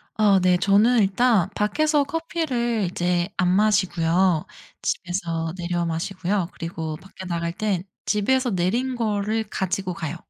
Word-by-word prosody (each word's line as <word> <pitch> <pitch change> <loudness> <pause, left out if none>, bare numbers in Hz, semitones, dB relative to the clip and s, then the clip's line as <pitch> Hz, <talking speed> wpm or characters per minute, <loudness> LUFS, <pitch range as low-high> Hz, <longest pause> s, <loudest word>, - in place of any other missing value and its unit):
어 205 -3 +4
네 180 0 +3
저는 210 +6 +4
일단 200 -1 +3
밖에서 295 +8 +2
커피를 270 - -1
이제 175 0 0
안 180 -1 +2
마시고요. 180 -4 +2 0.4
집에서 170 -3 -2
내려 175 -1 -1
마시고요. 180 +3 -2
그리고 160 -2 -5
밖에 190 0 -12
나갈 170 -1 -2
땐 195 -3 -1 0.2
집에서 245 +4 +1
내린 230 +9 0
거를 220 -1 -1
가지고 190 -2 -2
가요. 160 0 -5
190 Hz, 280 characters per minute, -23 LUFS, 175-220 Hz, 0.4 s, 어